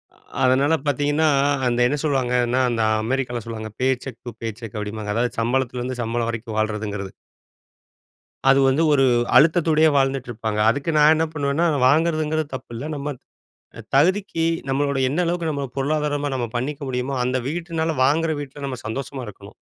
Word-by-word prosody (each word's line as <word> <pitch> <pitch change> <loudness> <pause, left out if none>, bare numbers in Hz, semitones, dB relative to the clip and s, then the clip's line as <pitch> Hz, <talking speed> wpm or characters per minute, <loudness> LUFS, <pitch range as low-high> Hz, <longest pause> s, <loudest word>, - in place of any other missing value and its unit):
அ - - -26 0.3
அதனால 135 +4 +3
பார்த்தீங்கன்னா, 145 +3 +1 0.4
அந்த 120 -1 +1
என்ன 145 +3 -1
சொல்வாங்கன்னா, 125 -3 +1
அந்த 115 -1 -1 0.2
அமெரிக்காவுல 125 -1 -2
சொல்லுவாங்க. 110 -1 -6
Pay 130 - +3 0.2
check 130 -4 -8
two 120 - -5
pay 115 - -3
check 115 -3 -8
அப்பிடீம்பாங்க. 105 0 -4
அதாவது 120 +1 -1
சம்பளத்துலருந்து 125 +1 -1
சம்பளம் 115 0 -1
வரைக்கும் 115 -1 -6
வாழ்றதுங்கிறது. 105 -2 -2 1.4
அது 135 - +6
வந்து, 135 +5 +2
ஒரு 135 -2 +4 0.3
அழுத்தத்தோடையே 160 0 +4
வாழ்ந்துட்டு 135 -2 0
இருப்பாங்க. 110 -2 -3
அதுக்கு 140 +6 -1
நான் 150 +1 +7
என்ன 160 +1 +1
பண்ணுவேன்னா, 145 +2 0 0.2
வாங்குறதுங்கிறது 155 0 +1
தப்பு 130 - -9
இல்ல. 120 +6 -5
நம்ம 145 +1 -4 0.6
த - - -8
தகுதிக்கு 180 +3 +2 0.3
நம்மளோட 140 +1 0
என்ன 150 +6 -1
அளவுக்கு 170 -1 -1
நம்மள 140 -2 -3
பொருளாதாரமா 145 0 -1
நம்ம 120 -2 -2
பண்ணிக்க 140 +4 -4
முடியுமோ, 130 +2 -2
அந்த 130 +1 0
வீட்டினால 165 -1 -2
வாங்குற 160 +4 +2
வீட்ல 140 0 -9
நம்ம 130 -2 -4
சந்தோஷமா 135 +3 -5
இருக்கணும்! 100 0 -12
135 Hz, 155 wpm, -22 LUFS, 120-150 Hz, 1.4 s, நான்